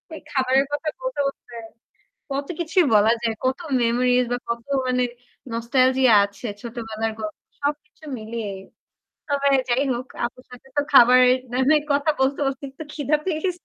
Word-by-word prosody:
এই -, -, -10 dB
খাবারের 265 Hz, 0 st, +2 dB
কথা 305 Hz, +2 st, -2 dB
বলতে, -, -, -4 dB
বলতে 240 Hz, -4 st, -8 dB, 0.7 s
কত 275 Hz, +1 st, -3 dB
কিছুই 340 Hz, 0 st, +2 dB
বলা 215 Hz, +2 st, +5 dB
যায়, 225 Hz, -1 st, 0 dB
কত 260 Hz, +4 st, +1 dB, 0.2 s
মেমোরিজ 245 Hz, +1 st, +2 dB
বা 245 Hz, -, 0 dB
কত 235 Hz, 0 st, -3 dB, 0.2 s
মানে 250 Hz, 0 st, +1 dB, 0.5 s
nostalgia 255 Hz, +1 st, +3 dB
আছে 200 Hz, +3 st, -7 dB
ছোটবেলার 225 Hz, -2 st, -4 dB
গল্প 210 Hz, -1 st, -5 dB, 0.2 s
সবকিছু 300 Hz, +2 st, -4 dB
মিলিয়েই। 215 Hz, -3 st, -5 dB, 0.7 s
তবে 280 Hz, 0 st, +1 dB, 0.2 s
যাই 255 Hz, +4 st, +2 dB
হোক, 245 Hz, +2 st, -4 dB, 0.2 s
আপুর 250 Hz, +1 st, -11 dB
সাথে 250 Hz, +2 st, -14 dB
তো 290 Hz, -, +3 dB
খাবারের 255 Hz, 0 st, +7 dB
না 250 Hz, -, -1 dB
হয় 305 Hz, -1 st, +4 dB
কথা 285 Hz, +2 st, +2 dB
বলতে, 275 Hz, +2 st, +1 dB
বলতে 270 Hz, +1 st, -3 dB
একটু 275 Hz, -, -10 dB
ক্ষিধা 295 Hz, 0 st, +1 dB
পেয়েছে। 355 Hz, +1 st, 0 dB
255 Hz, 155 wpm, -23 LUFS, 235-285 Hz, 0.7 s, খাবারের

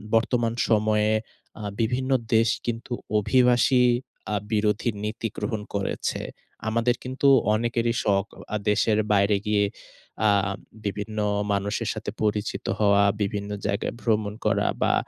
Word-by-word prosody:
বর্তমান 115 Hz, 0 st, +2 dB, 0.2 s
সময়ে 105 Hz, 0 st, +3 dB, 0.5 s
আ -, -, -6 dB, 0.2 s
বিভিন্ন 130 Hz, +4 st, 0 dB, 0.2 s
দেশ 115 Hz, 0 st, +4 dB, 0.2 s
কিন্তু 120 Hz, +1 st, -3 dB, 0.3 s
অভিবাসী 125 Hz, +2 st, +4 dB, 0.5 s
আ -, -, +1 dB, 0.2 s
বিরোধী 105 Hz, +1 st, +1 dB
নীতি 110 Hz, +2 st, -2 dB
গ্রহণ 105 Hz, 0 st, -2 dB
করেছে। 100 Hz, -1 st, -2 dB, 0.5 s
আমাদের 115 Hz, +2 st, +2 dB
কিন্তু 130 Hz, +2 st, 0 dB, 0.3 s
অনেকেরি 115 Hz, +1 st, 0 dB
শখ 100 Hz, -1 st, +2 dB
অ -, -, -9 dB
আ -, -, +2 dB
দেশের 105 Hz, +1 st, +2 dB
বাইরে 100 Hz, 0 st, +3 dB
গিয়ে 105 Hz, -1 st, +3 dB, 0.6 s
আ -, -, +5 dB, 0.5 s
বিভিন্ন 105 Hz, +2 st, -3 dB, 0.3 s
মানুষের 100 Hz, +3 st, -1 dB
সাথে 110 Hz, -2 st, -5 dB
পরিচিত 105 Hz, 0 st, -1 dB
হওয়া, 100 Hz, -1 st, +4 dB, 0.2 s
বিভিন্ন 100 Hz, 0 st, -2 dB, 0.2 s
জায়গায় 100 Hz, +1 st, -1 dB
ভ্রমণ 105 Hz, -1 st, 0 dB
করা 100 Hz, -1 st, +2 dB
বা, -, -, +3 dB
110 Hz, 125 wpm, -25 LUFS, 105-115 Hz, 0.6 s, আ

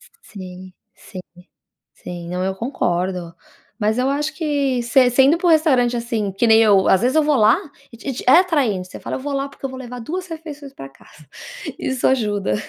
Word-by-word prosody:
S -, -, -20 dB
Sim. 185 Hz, -2 st, -11 dB, 0.2 s
Sim, 185 Hz, -, -10 dB, 0.7 s
sim. 175 Hz, -1 st, -8 dB
Não, 180 Hz, +1 st, -3 dB
eu 190 Hz, 0 st, -1 dB
concordo. 180 Hz, -6 st, -2 dB, 0.4 s
Mas 215 Hz, 0 st, 0 dB
eu 255 Hz, +2 st, +1 dB
acho 295 Hz, +2 st, -2 dB
que 280 Hz, -6 st, -1 dB
se 250 Hz, +2 st, +4 dB
sendo 270 Hz, +6 st, +4 dB
para 355 Hz, -, -2 dB
o -, -, +5 dB
restaurante 265 Hz, -7 st, +3 dB
assim 230 Hz, -4 st, -2 dB
que 195 Hz, +5 st, 0 dB
nem 220 Hz, -1 st, +6 dB
eu, 200 Hz, -3 st, +4 dB
às 190 Hz, -, +4 dB
vezes, 255 Hz, +4 st, +1 dB
eu 315 Hz, -, +5 dB
vou 295 Hz, -1 st, +2 dB
lá, 220 Hz, 0 st, +5 dB, 0.4 s
e -, -, -11 dB
te 270 Hz, -, -5 dB
te 250 Hz, -, -7 dB
é 270 Hz, -, +8 dB
atraente, 260 Hz, -, 0 dB
você -, -, -10 dB
fala: -, -, -4 dB
"Eu -, -, -7 dB
vou 285 Hz, +1 st, -4 dB
lá 275 Hz, 0 st, -2 dB
porque 275 Hz, -, -17 dB
eu 270 Hz, -, -2 dB
vou 260 Hz, -, -8 dB
levar 250 Hz, -1 st, -8 dB
2 360 Hz, +10 st, -5 dB
refeições 300 Hz, -4 st, -9 dB
para 135 Hz, -, -9 dB
casa." 145 Hz, +2 st, -20 dB, 0.5 s
Isso 260 Hz, -1 st, -1 dB
ajuda. 210 Hz, -, 0 dB
245 Hz, 215 wpm, -20 LUFS, 195-280 Hz, 0.7 s, é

